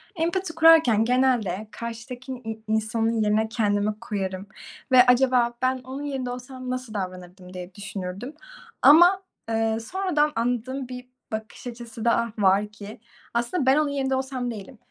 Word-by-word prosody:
Empati 340 +1 -1
kurarken 320 -10 +6
genelde 240 -6 +1
karşıdaki 240 +3 -7
i 225 -3 -7
insanın 220 +1 0
yerine 215 +1 +2
kendimi 210 -2 0
koyarım 195 -4 -4 0.4
ve 250 -1 +8
acaba, 250 -1 +4
"Ben 255 0 +1
onun 265 +3 -6
yerinde 270 -3 -3
olsam 250 +1 -7
nasıl 255 -3 -4
davranırdım?" 185 -1 -7
diye 180 0 -8
düşünürdüm 200 +4 -6 0.5
ama, 350 +6 +7 0.3
eee, 225 0 +1
sonradan 305 +2 0
anladığım 245 +3 -2
bir 250 0 -8 0.2
bakış 220 +3 -6
açısı 235 -1 -8
daha 235 0 +2
var 200 +1 +3
ki 210 0 -11 0.3
aslında 240 +6 0
ben 265 +3 +5
onun 305 -1 +2
yerinde 270 -1 -1
olsam 260 -2 -3
değilim. 225 +3 -9
235 Hz, 140 wpm, -25 LUFS, 215-260 Hz, 0.5 s, ve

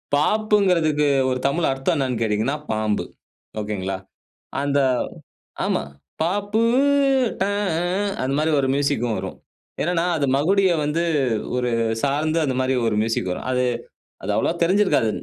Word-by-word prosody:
பாப்புங்கிறதுக்கு 180 -5 +2 0.2
ஒரு 125 0 -1
தமிழ் 160 +4 +1
அர்த்தம் 135 +6 0
என்னன்னு 130 -4 -1
கேட்டீங்கன்னா, 110 +6 0 0.2
பாம்பு. 110 -1 0 0.6
ஒகேங்களா. 95 -3 -3 0.6
அந்த 140 0 +1 0.9
ஆமா. - - 0 0.4
பாப்பு 205 +5 0 0.8
ட - - +5
அ 205 0 -1 0.2
ஆஹ். 195 +3 -1
அந்த 135 +1 -1
மாரி 155 +1 +1
ஒரு 135 - +1
மியூசிக்கும் 120 -5 0
வரும். 95 0 -6 0.4
என்னன்னா 170 +1 +1
அது 140 - +1
மகுடிய 190 +6 +3
வந்து 155 +3 0 0.5
ஒரு 125 -1 0 0.3
சார்ந்து 150 +3 0
அந்த 130 -3 -1
மாரி 130 0 +1
ஒரு 105 - 0
மியூசிக் 110 -5 -1
வரும். 90 - -5
அது 125 0 +1 0.6
அது - - -3
அவ்வளவா - - +1
தெரிந்சிருக்காது. 185 - +3
145 Hz, 135 wpm, -22 LUFS, 125-175 Hz, 0.9 s, ட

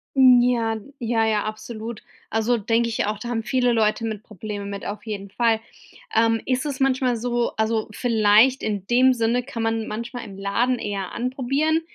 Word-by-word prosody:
Hm, 255 -2 +7
ja, 235 -2 +1 0.2
ja, 230 -1 +1
ja, 215 -2 +1
absolut. 220 +1 -6 0.3
Also 225 +2 +1
denke 230 +2 +1
ich 225 - -1
auch, 210 +1 -2
da 235 +4 -7
haben 225 -2 -2
viele 250 0 +1
Leute 220 0 +1
mit 215 -2 -4
Probleme 210 0 -7
mit, 200 0 -6
auf 210 +2 -6
jeden 200 -2 -5
Fall. 225 +1 +1 0.5
Ähm, 225 0 +3
ist 255 +2 0
es 280 -2 -4
manchmal 260 -2 +2
so 240 +1 -1
also 220 0 0
vielleicht 225 +3 +4
in 205 -3 -2
dem 255 +2 +5
Sinne 235 +1 +1
kann 240 -3 -5
man 225 -1 -1
manchmal 235 +2 -5
im 195 -2 -10
Laden 235 +6 0
eher 200 -3 -4
anprobieren, 270 +6 0
230 Hz, 180 wpm, -23 LUFS, 215-245 Hz, 0.5 s, Hm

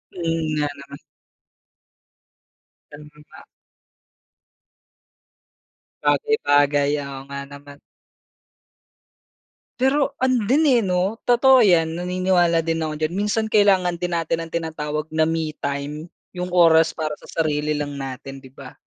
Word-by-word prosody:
Mm, 165 -2 -2
nga 150 -1 0
naman. 140 0 -12 1.9
Tama 145 +1 -11 0.3
ba. - - -13 2.6
Bagay-bagay. 145 - +2
Oo, 135 -1 -7
nga 140 0 -6
naman. 145 0 -13 2.0
Pero 275 +1 +1
ano 255 -1 +1
din, 305 +4 +3
eh, 250 -5 +4
'no, 190 +3 -1
totoo 250 +1 +5
'yan 170 -4 +2
naniniwala 180 -2 +1
din 165 0 -1
ako 155 -1 -2
dyan. 155 +2 -2
Minsan 210 +3 -1
kailangan 195 -5 +3
din 175 - -1
natin 165 0 -1
ang 165 - -7
tinatawag 155 -2 -4
na 160 0 +2
me 160 -2 -2
time. 145 +3 -5 0.2
'Yong 180 0 -4
oras 165 -2 +4
para 155 -1 -2
sa - - -13
sarili 150 -1 -1
lang 145 -1 -4
natin, 135 0 -7
'di 130 - -14
ba? 130 - -12
165 Hz, 120 wpm, -22 LUFS, 150-185 Hz, 2.6 s, totoo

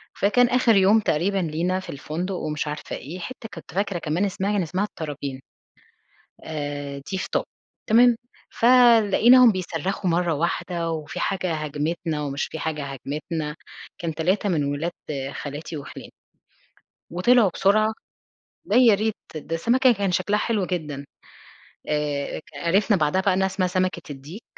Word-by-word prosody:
فكان 240 +5 +3
آخر 245 -3 +4
يوم 200 +3 +5
تقريبًا 195 +1 0
لينا 175 +1 0
في 185 - -10
الفندق 165 +7 -4
ومش 155 -3 -3
عارفة 150 0 -5
إيه، 165 +7 -8
حتة 225 +4 -8
كنت 165 -2 -11
فاكرة 195 -2 -1
كمان 165 +5 0
اسمها 195 +1 -1
كان 205 -2 +1
اسمها 185 +3 -1
الطرابين، 145 -8 -5 1.0
آآ 145 -2 -5
دي 190 - -1
في - - -3
طابا، - - 0 0.4
تمام؟ 240 +2 +6 0.3
فلقيناهم 240 0 +6
بيصرخوا 185 0 -2
مرّة 170 0 +1
واحدة، 170 +2 -2
وفي 155 -3 -5
حاجة 185 -3 -1
هاجمتنا 155 +1 -2
ومش 140 0 -2
في 160 - -7
حاجة 155 -2 -3
هاجمتنا، 150 +3 -4 0.4
كان 165 -2 -3
3 185 +6 +1
من 160 -5 +1
ولاد 145 +4 -2 0.4
خالاتي 145 +2 -6
وخِلاني. 140 - -9 1.0
وطلعوا 210 +5 +4
بسرعة، 215 +3 +3 0.7
ده 210 - 0
يا 245 -4 +7
ريت، 215 +1 0 0.2
ده 155 +2 -4
السمكة 250 +9 +4
كان 200 -4 -1
شكلها 195 +4 +1
حلو 210 -5 0
جدًا. 150 -6 -4 0.8
آآ 150 -2 -1
ك - - -13
عِرِفنا 195 +5 +2
بعدها 155 +2 +1
بقى 190 0 +2
إنها 190 +1 +2
اسمها 190 -1 0
سمكة 185 0 -1
الديك، 145 - -10
180 Hz, 145 wpm, -24 LUFS, 155-200 Hz, 1.0 s, يا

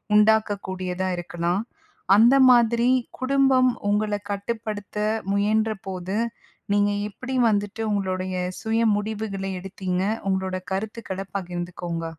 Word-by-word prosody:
உண்டாக்கக்கூடியதா 195 -4 +2
இருக்கலாம். 175 +3 -2 0.5
அந்த 235 +5 +6
மாதிரி 235 -1 +4 0.3
குடும்பம் 260 -1 +4 0.2
உங்கள 210 0 +1 0.2
கட்டுப்படுத்த 210 0 -4 0.3
முயன்றபோது, 200 -2 -1 0.6
நீங்க 205 0 +3 0.2
எப்படி 260 +5 -6
வந்துட்டு 205 +1 -1
உங்களுடைய 185 -1 -2 0.3
சுய 225 +1 0 0.2
முடிவுகள 205 -2 -3 0.2
எடுத்தீங்க? 185 -1 -3 0.3
உங்களோட 190 -1 -1 0.2
கருத்துக்கள 195 -1 -4
பகிர்ந்துக்கோங்க. 175 -2 -4
205 Hz, 90 wpm, -24 LUFS, 185-220 Hz, 0.6 s, அந்த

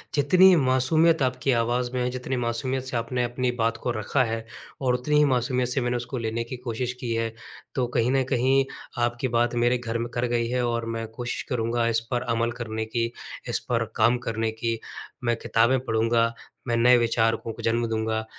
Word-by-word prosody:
जितनी 180 +6 +6
मासूमियत 150 +3 +3
आपकी 130 +1 0
आवाज़ 120 +1 +1
में 125 - -1
है, 125 - 0
जितनी 130 +1 -3
मासूमियत 125 +2 -1
से 130 -2 -3
आपने 125 +2 -1
अपनी 125 +1 -1
बात 115 0 +1
को 125 - 0
रखा 130 +5 +1
है 115 -1 -3 0.4
और 130 -2 +2
उतनी 125 +5 +1
ही 150 - +6
मासूमियत 125 -1 +1
से 130 +2 0
मैंने 120 0 0
उसको 120 +2 -5
लेने 115 0 -2
की 120 +2 -7
कोशिश 125 0 -3
की 120 -2 -2
है। 115 0 -1 0.4
तो 125 -2 +1
कहीं 120 +1 +2
न 135 -1 +3
कहीं 135 +1 +3 0.4
आपकी 120 +2 0
बात 120 +1 +1
मेरे 120 +1 +3
घर 115 -1 -3
म 120 - -2
कर 120 0 0
गई 120 -1 0
है 125 0 0
और 115 -1 -1
मैं 115 0 -4
कोशिश 120 +2 -4
करूँगा 115 -1 0
इस 115 -1 +2
पर 120 -1 +1
अमल 115 +1 0
करने 110 -2 -4
की, 115 +1 -1 0.4
इस - - +2
पर 115 -2 +1
काम 115 +2 +4
करने 115 0 -1
की 115 0 -2 0.4
मैं 120 -1 +2
किताबें 115 +4 +2
पढ़ूँगा, 115 0 +2 0.3
मैं 120 - +1
नए 125 +1 +6
विचारकों 115 -1 +1
को - - -9
जन्म 115 +1 +1
दूँगा 110 0 -1
120 Hz, 200 wpm, -25 LUFS, 115-125 Hz, 0.4 s, जितनी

